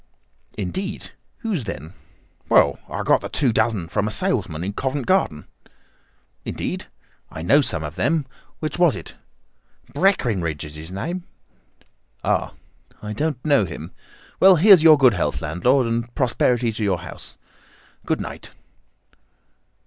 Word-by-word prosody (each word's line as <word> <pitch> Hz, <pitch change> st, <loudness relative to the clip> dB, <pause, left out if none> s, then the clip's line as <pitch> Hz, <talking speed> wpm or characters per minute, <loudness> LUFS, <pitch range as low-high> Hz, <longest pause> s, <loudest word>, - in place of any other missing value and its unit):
"Indeed! 190 Hz, -, -4 dB, 0.3 s
Whose, 205 Hz, -, -2 dB
then?" 80 Hz, -4 st, -7 dB, 0.6 s
"Well, -, -, +4 dB
I -, -, -3 dB
got -, -, +3 dB
the -, -, -6 dB
two 130 Hz, -6 st, +1 dB
dozen 110 Hz, -6 st, 0 dB
from 100 Hz, +4 st, -1 dB
a -, -, 0 dB
salesman 110 Hz, -, -1 dB
in 100 Hz, +2 st, -3 dB
Covent 130 Hz, +3 st, -2 dB
Garden." 135 Hz, -, +1 dB, 1.0 s
"Indeed? -, -, -4 dB, 0.4 s
I 80 Hz, -, -7 dB
know 140 Hz, -, +5 dB
some 85 Hz, -, -2 dB
of 75 Hz, -1 st, -5 dB
them. 160 Hz, -3 st, +1 dB, 0.4 s
Which 155 Hz, +2 st, -3 dB
was 175 Hz, -5 st, +4 dB
it?" 85 Hz, -, -8 dB, 0.8 s
"Breckinridge 95 Hz, -, +1 dB
is 75 Hz, -, -10 dB
his 80 Hz, +3 st, -8 dB
name." 170 Hz, -, -4 dB, 1.0 s
"Ah! -, -, 0 dB, 0.5 s
I 105 Hz, 0 st, -4 dB
don't 145 Hz, +2 st, -2 dB
know 140 Hz, -9 st, +4 dB
him. 85 Hz, -1 st, -8 dB, 0.5 s
Well, 190 Hz, 0 st, +8 dB
here's 185 Hz, +1 st, +7 dB
your 155 Hz, -1 st, +8 dB
good 130 Hz, -4 st, +5 dB
health 90 Hz, -, -1 dB
landlord, 120 Hz, -, +1 dB
and 115 Hz, +1 st, -3 dB
prosperity 125 Hz, -2 st, +1 dB
to 110 Hz, 0 st, -4 dB
your 95 Hz, -4 st, 0 dB
house. -, -, -10 dB, 0.7 s
Good -, -, -1 dB
night." -, -, -7 dB
120 Hz, 140 wpm, -22 LUFS, -, 1.0 s, Well